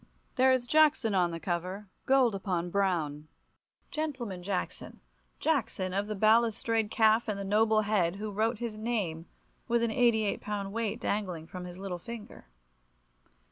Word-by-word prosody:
There 260 0 +4
is 255 -2 +2
Jackson 300 -5 +4
on 180 -2 +3
the 165 0 -5
cover, 185 +4 -3 0.2
gold 260 -4 +4
upon 180 -3 -2
brown, 165 -7 0 0.6
"gentleman 255 -12 -3
Jackson," 185 0 -4 0.4
Jackson 230 -11 0
of 200 +2 -1
the 215 - -3
balustrade 225 +1 +2
calf 220 +1 +3
and 210 -2 -2
the - - -3
noble 215 +2 +3
head, 200 -5 +1
who 210 +1 -5
wrote 220 +3 0
his 230 -2 -5
name 200 -8 -2 0.4
with 235 -1 +2
an 230 - +1
88 220 -3 +2
pound 200 -2 -4
weight 230 -2 -2
dangling 185 -6 -2
from 180 +2 -8
his 180 0 -9
little 190 -2 -5
finger. 220 - -9
210 Hz, 150 wpm, -30 LUFS, 185-230 Hz, 0.6 s, There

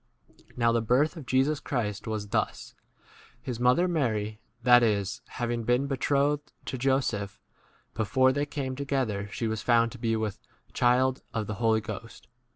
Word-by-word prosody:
18 - - -26
Now 115 -1 +3
the 115 0 +2
birth 130 +9 +2
of 150 -7 -9
Jesus 135 +3 +2
Christ 110 -9 -3
was 105 -2 -3
thus: 110 0 -2 0.7
His 120 -3 -5
mother, 125 +9 +4
Mary, 110 - -1 0.2
that 120 0 +7
is, 105 +1 0
having 120 -1 -3
been 125 +4 +2
betrothed 140 +2 0
to 130 - -4
Jo 135 +1 +3
seph, 105 -5 -4 0.5
before 120 +5 +3
they 145 +1 -1
came 135 -3 -4
together, 130 -8 -2
she 115 - -2
was 110 -1 -2
found 115 -1 +3
to 125 - -10
be 115 -1 0
with 110 -1 -3 0.3
child 130 +1 +3 0.2
of 110 - +1
19 - - -8
[the] - - -1
Holy 110 -1 +3
Ghost. 110 +1 -8
120 Hz, 170 wpm, -28 LUFS, 110-130 Hz, 0.7 s, that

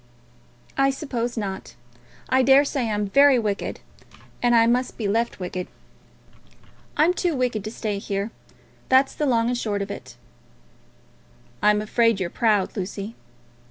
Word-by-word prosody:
"I 275 0 +4
suppose 245 -4 -3
not. 195 -3 -5 0.5
I 260 0 +3
daresay 270 -2 +3
I'm 210 -1 -1
very 280 +3 +6
wicked, 210 -4 -2 0.6
and 240 -1 +3
I 230 0 +6
must 245 +2 0
be 215 - -2
left 230 +2 0
wicked. 180 0 -4 1.3
I'm 315 +4 +4
too 350 -3 -1
wicked 245 -5 -1
to - - -3
stay 210 -3 -3
here. 200 +2 -3 0.6
That's 265 +1 +4
the 300 - -1
long 230 -3 +2
and - - 0
the - - -3
short 205 -3 -1
of 200 - -7
it." - - -9 1.5
"I'm 210 0 +3
afraid 230 -1 +2
you're 175 -2 -2
proud, 210 -4 +1
Lucy." 200 +2 -5
230 Hz, 145 wpm, -23 LUFS, 205-260 Hz, 1.5 s, very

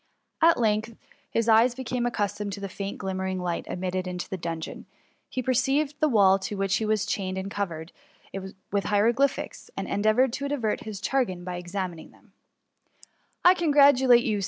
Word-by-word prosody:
At 330 -4 +5
length, 215 -1 +1
as - - -24 0.3
his 230 0 0
eyes 230 +2 +5
became 250 -1 -2
axrcustomed 210 -2 -2
to 200 - -6
the 200 - -4
faint 195 +1 -5
glimmering 190 -1 -3
light 175 -1 -3
admitted 185 0 -3
into 180 -1 -4
the - - -4
dungeon, 165 -2 -6 0.4
he 255 - -3
perceived 270 +4 +1
the 310 - +3
wall 195 -5 +5
to 200 +2 -4
which 195 -1 +1
he 220 - -2
was 215 -2 +1
chained 190 -1 -2
was 190 - -3
covered 170 -5 -4 0.8
with 200 0 0
hieroglyphics, 235 +7 +1
and - - -3
endeavoured 215 +5 +2
to 280 +2 -3
divert 240 -8 -2
his 210 -3 -6
chagrin 225 -10 0
by 180 0 -5
examining 175 -2 -5
them, - - -24 0.7
^* - - -43 0.4
I 360 - +9
congratulate 280 -7 +5
you. 215 -4 0
210 Hz, 175 wpm, -26 LUFS, 190-250 Hz, 0.8 s, I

